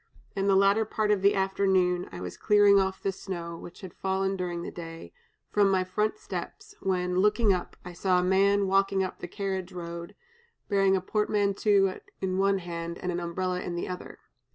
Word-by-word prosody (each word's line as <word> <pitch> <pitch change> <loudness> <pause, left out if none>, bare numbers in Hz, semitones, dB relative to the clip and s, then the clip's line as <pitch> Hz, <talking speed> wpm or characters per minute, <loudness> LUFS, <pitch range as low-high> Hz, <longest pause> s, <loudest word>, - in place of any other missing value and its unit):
In 195 0 0
the 195 - +4
latter 200 +3 +4
part 215 0 0
of 205 -2 +2
the 200 +1 +4
afternoon, 190 -2 +1
I 90 - -8
was 90 -1 -6
clearing 205 -1 +5
off 190 0 -1
the 195 - +1
snow, 175 -3 -6
which 170 0 -11
had 185 -3 -9
fallen 190 0 -1
during 175 -2 -3
the - - -6
day, 165 - -9 0.4
from 205 -1 +4
my 190 -1 +2
front 210 - -1
steps, 425 0 -7
when, 180 -1 0
looking 210 +1 +4
up, 180 - -4
I 180 - -7
saw 180 +1 +2
a - - 0
man 195 +2 +3
walking 195 0 +2
up 185 - -5
the - - -6
carriage 190 -1 -4
road, 170 -1 -7 0.5
bearing 195 -2 +3
a 190 - 0
portmanteau 200 -1 +1 0.2
in 185 0 -1
one 195 0 +3
hand 170 -2 -5
and 180 - -3
an 175 - -2
umbrella 180 +1 -2
in 175 - -4
the 175 - -3
other. 180 0 -7
190 Hz, 195 wpm, -28 LUFS, 180-200 Hz, 0.5 s, clearing